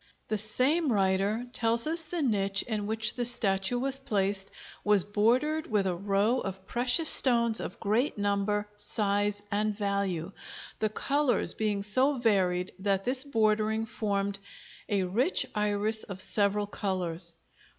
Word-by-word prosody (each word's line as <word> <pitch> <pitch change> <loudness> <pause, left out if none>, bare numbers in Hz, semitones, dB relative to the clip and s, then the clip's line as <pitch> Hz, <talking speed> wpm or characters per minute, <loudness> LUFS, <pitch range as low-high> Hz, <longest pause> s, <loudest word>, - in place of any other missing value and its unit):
The 215 - 0
same 260 +8 +1
writer 200 +3 0
tells 230 0 +1
us 325 +2 +1
the 325 0 -4
niche 195 -5 +1
in 210 -3 -4
which 220 0 0
the 245 - -3
statue 220 -2 +1
was 270 +2 -1
placed 200 -5 -1 0.3
was 205 -3 +4
bordered 245 - 0
with 210 -3 0
a 185 - 0
row 200 +6 0
of 190 -2 -6
precious 245 - +3
stones 235 -3 +6
of - - -7
great 225 +6 0
number, 205 +1 -1
size, 205 0 -1
and 210 0 -1
value, 200 -4 -2 0.5
the 215 - 0
colors 280 +4 0
being 210 -2 -2
so 260 +7 +2
varied 185 -6 +1
that 195 0 -1
this 255 +1 +2
bordering 220 -4 0
formed 200 -3 -2 0.5
"a 200 -2 +1
rich 230 - +1
Iris 210 +1 -1
of 195 -2 -8
several 205 +1 +2
colors." 180 -5 -3
210 Hz, 140 wpm, -28 LUFS, 200-240 Hz, 0.5 s, stones